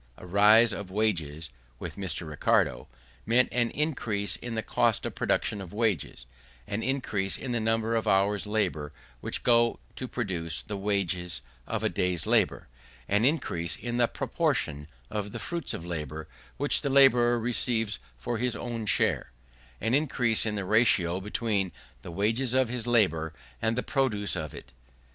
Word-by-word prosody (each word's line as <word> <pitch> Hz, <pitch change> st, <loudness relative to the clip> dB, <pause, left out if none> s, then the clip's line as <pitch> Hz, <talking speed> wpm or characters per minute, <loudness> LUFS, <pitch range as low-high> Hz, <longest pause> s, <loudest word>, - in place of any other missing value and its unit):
A -, -, -11 dB
rise 105 Hz, +5 st, +6 dB
of 95 Hz, -1 st, -6 dB
wages, 80 Hz, -, -1 dB, 0.3 s
with -, -, -6 dB
Mr. 90 Hz, -4 st, -2 dB
Ricardo, 75 Hz, -1 st, +1 dB, 0.4 s
meant 120 Hz, +3 st, +3 dB
an 120 Hz, -1 st, +1 dB
increase 120 Hz, -9 st, -1 dB
in 120 Hz, -1 st, -6 dB
the 110 Hz, -, -2 dB
cost -, -, +1 dB
of -, -, -3 dB
production 105 Hz, -, 0 dB
of 95 Hz, -1 st, -9 dB
wages; 105 Hz, -, -1 dB, 0.4 s
an 100 Hz, -, -3 dB
increase 110 Hz, -7 st, -1 dB
in 130 Hz, -, -5 dB
the 120 Hz, -, 0 dB
number 115 Hz, +1 st, +1 dB
of 115 Hz, -, -1 dB
hours' 100 Hz, +2 st, +2 dB
labour 90 Hz, -9 st, -1 dB, 0.3 s
which -, -, -2 dB
go 120 Hz, -1 st, +4 dB, 0.2 s
to 130 Hz, -, -4 dB
produce 90 Hz, -10 st, -2 dB
the 105 Hz, -, -5 dB
wages 95 Hz, -3 st, -1 dB, 0.2 s
of -, -, -2 dB
a -, -, +3 dB
day's 90 Hz, -2 st, 0 dB
labour; -, -, +2 dB, 0.4 s
an 105 Hz, +3 st, +2 dB
increase 85 Hz, -, 0 dB
in 120 Hz, 0 st, -4 dB
the 120 Hz, -1 st, +4 dB
proportion 75 Hz, -8 st, -1 dB, 0.2 s
of 105 Hz, 0 st, -3 dB
the -, -, -4 dB
fruits 165 Hz, +8 st, -4 dB
of 85 Hz, -, -5 dB
labour 80 Hz, -2 st, -5 dB, 0.3 s
which 145 Hz, +1 st, +2 dB
the 140 Hz, -, -1 dB
labourer 125 Hz, -3 st, +5 dB
receives 115 Hz, -2 st, 0 dB, 0.2 s
for 120 Hz, -2 st, -3 dB
his 125 Hz, 0 st, 0 dB
own 115 Hz, -3 st, -4 dB
share; -, -, +1 dB, 0.5 s
an 115 Hz, +3 st, -1 dB
increase 125 Hz, -6 st, +2 dB
in 105 Hz, -, -1 dB
the 100 Hz, -2 st, -2 dB
ratio 95 Hz, -5 st, +3 dB
between 105 Hz, -2 st, -1 dB, 0.3 s
the -, -, -9 dB
wages 115 Hz, +8 st, 0 dB
of 130 Hz, -3 st, +3 dB
his 120 Hz, -1 st, -3 dB
labour 85 Hz, -10 st, +2 dB, 0.3 s
and 115 Hz, +1 st, 0 dB
the 125 Hz, -, 0 dB
produce 115 Hz, -9 st, 0 dB
of 80 Hz, -5 st, -4 dB
it. 70 Hz, -, -11 dB
110 Hz, 165 wpm, -28 LUFS, 90-120 Hz, 0.5 s, rise